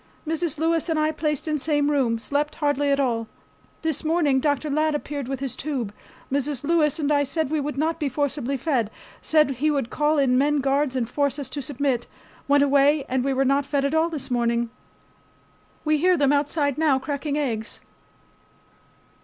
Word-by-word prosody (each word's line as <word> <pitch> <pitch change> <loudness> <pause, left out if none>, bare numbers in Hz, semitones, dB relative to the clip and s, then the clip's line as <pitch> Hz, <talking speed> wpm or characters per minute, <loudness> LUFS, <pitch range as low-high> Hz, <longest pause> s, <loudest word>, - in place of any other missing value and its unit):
Mrs. 325 -1 -1
Lewis 330 +2 +1
and 320 - +1
I 310 0 +2
placed 300 -1 -2
in 305 -1 0
same 290 0 +1
room. 255 -6 +1
Slept 290 +5 -1
hardly 290 -1 0
at 280 0 +2
all. 230 -4 0 0.6
This 320 -2 -1
morning 310 -4 +2
Dr. 290 +1 0
Ladd 305 +1 +1
appeared 285 -3 -4
with 270 0 -4
his 270 -3 -3
tube. 260 -8 -3 0.4
Mrs. 280 -1 -1
Lewis 305 -2 +2
and 300 -2 0
I 290 -1 +4
said 285 +1 -1
we 310 - +1
would 290 -1 -3
not 320 +2 0
be 295 -3 0
forcibly 280 0 -1
fed. 255 -6 0 0.3
Said 305 -3 +3
he 305 +4 +1
would 275 -6 -1
call 300 +1 +1
in 260 -3 +3
men 295 +1 +2
guards 275 0 +1
and 245 -3 0
force 280 +2 0
us 275 -3 -6
to 290 - -3
submit. 265 -2 -1 0.4
Went 285 0 +4
away 285 +1 +3
and 255 -1 0
we 275 - 0
were 270 0 +1
not 275 +2 +2
fed 280 0 -1
at 280 - 0
all 320 +1 +2
this 305 -6 -6
morning. 235 -1 0 1.1
We 305 0 +2
hear 360 +2 +4
them 285 -1 +3
outside 285 0 0
now 300 -4 +3
cracking 285 +2 -3
eggs. 230 -7 -3
285 Hz, 190 wpm, -24 LUFS, 265-305 Hz, 1.1 s, I